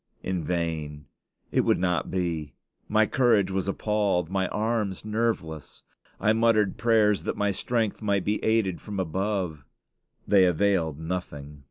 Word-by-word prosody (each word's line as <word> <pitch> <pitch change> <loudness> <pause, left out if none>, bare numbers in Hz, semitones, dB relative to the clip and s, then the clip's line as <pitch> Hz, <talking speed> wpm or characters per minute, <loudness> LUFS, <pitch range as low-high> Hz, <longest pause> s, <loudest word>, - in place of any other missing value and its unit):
In 90 -3 -2
vain; 80 -3 -3 0.5
it - - +3
would - - +2
not 90 -1 0
be; 85 -5 -2 0.3
my 110 0 +3
courage 110 -6 +2
was 95 0 -1
appalled, 100 -4 0
my 95 -1 0
arms 105 -2 -2
nerveless. 105 - -3 0.4
I 110 - +3
muttered 110 -3 +2
prayers 110 -3 +3
that - - -3
my 105 0 +1
strength 115 +2 -1
might 100 -3 0
be 105 +1 -1
aided 110 -5 +1
from 105 -2 -5
above. 95 -3 -2 0.6
They 95 -2 +5
availed 90 -4 +1
nothing. 75 -4 -5
95 Hz, 140 wpm, -26 LUFS, 85-105 Hz, 0.6 s, They